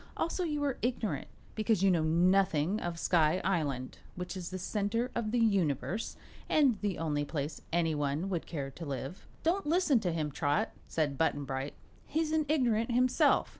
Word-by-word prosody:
Also, 350 +2 -1
you 300 -3 -1
are 275 -3 -1
ignorant, 240 -4 -1 0.3
because 215 -3 +1
you 195 - +6
know 170 -3 +3
nothing 175 +2 +3
of 175 -3 -3
Sky 165 0 +3
Island, 145 -9 -1 0.2
which 180 +1 -5
is 180 -2 -5
the 185 - -4
Center 215 +6 -1
of 230 -2 -1
the 245 - 0
Universe 200 - +1 0.3
and 270 -9 +3
the 205 -4 -1
only 150 -3 0
place 145 0 -4
anyone 160 -1 0
would 180 -4 -2
care 140 -5 -4
to 165 - -9
live." 135 +5 -5 0.2
"Don't 340 0 +1
listen 320 -5 +3
to 185 -5 -1
him, 155 -3 -2
Trot," 145 +9 0 0.2
said 145 -4 -1
Button 145 -3 +1
Bright; 135 +1 -4 0.3
"he's 315 0 0
an 310 -2 +1
ignorant 240 -7 +2
himself." 250 +1 +3
185 Hz, 170 wpm, -31 LUFS, 155-235 Hz, 0.3 s, you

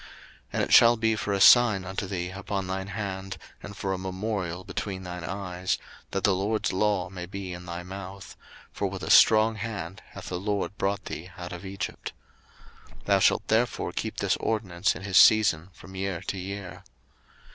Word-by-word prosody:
02:013:009 - - -15 0.4
And - - +1
it - - 0
shall 120 0 +8
be 110 0 +2
for 105 - -3
a 100 - +1
sign 110 -3 +7
unto 95 +1 -4
thee 90 -2 -3
upon 95 0 -4
thine 95 +1 -3
hand, 95 -1 -5 0.2
and 100 -1 -9
for 95 -2 -2
a 95 - -3
memorial 95 -2 -3
between 95 0 -5
thine 90 -1 -6
eyes, 90 -1 -2 0.3
that 95 - -3
the 100 - +4
LORD's 100 +3 -1
law 95 -2 +1
may 90 -2 -7
be 95 -1 -6
in 90 0 -9
thy 85 0 -5
mouth: 95 +1 -9 0.4
for - - -2
with - - -6
a - - -1
strong 110 0 +6
hand 100 -5 -5
hath - - -8
the 90 - -3
LORD 100 +1 -2
brought 100 +1 -1
thee 90 +4 -6
out 90 0 -7
of 90 - -8
Egypt. 95 -1 -5 0.9
02:013:010 - - -24
Thou - - +4
shalt - - +3
therefore 115 +3 +1
keep - - -4
this - - +1
ordinance 95 -4 0
in - - -8
his 95 -2 +1
season 100 -6 +6
from 95 +2 -14
year 95 -2 -3
to 95 0 -4
year. 95 0 -7
95 Hz, 190 wpm, -27 LUFS, 90-100 Hz, 0.9 s, shall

